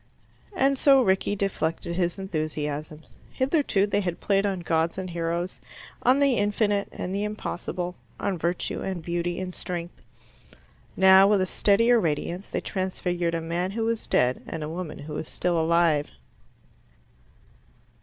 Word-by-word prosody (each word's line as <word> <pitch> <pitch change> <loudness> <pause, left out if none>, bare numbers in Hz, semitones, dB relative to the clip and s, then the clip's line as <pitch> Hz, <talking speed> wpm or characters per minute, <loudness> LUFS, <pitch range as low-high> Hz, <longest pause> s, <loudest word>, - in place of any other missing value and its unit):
And 275 -3 +2
so 275 -2 +6
Rickie 190 0 +1
deflected 170 -4 -2
his 175 0 0
enthusiasms. 155 -4 -4 0.2
Hitherto 265 - +2
they 205 0 0
had 175 -3 -3
played 200 0 +2
on 190 -3 -2
gods 165 0 0
and 185 -1 -4
heroes, 170 +1 -3 0.4
on 255 +2 +4
the 280 -4 +3
infinite 205 0 +1
and 185 - -5
the 200 +1 -1
impossible, 180 -4 -4 0.3
on 200 - -1
virtue 170 +1 -2
and 185 -4 -4
beauty 175 +1 -2
and 185 -1 -4
strength. 175 -1 -6 1.0
Now, 190 0 +7
with 205 -1 +4
a - - +2
steadier 230 +5 +4
radiance, 170 +2 -2
they - - -2
transfigured 180 -3 -2
a 165 - -2
man 170 +3 -2
who 225 +3 -2
was 230 -1 -2
dead 125 +1 +2
and 160 -2 -5
a 150 - -4
woman 165 -2 -5
who 150 +1 -8
was 150 - -5
still 175 -2 0
alive. 165 -2 +2
180 Hz, 150 wpm, -26 LUFS, 165-200 Hz, 1.0 s, Now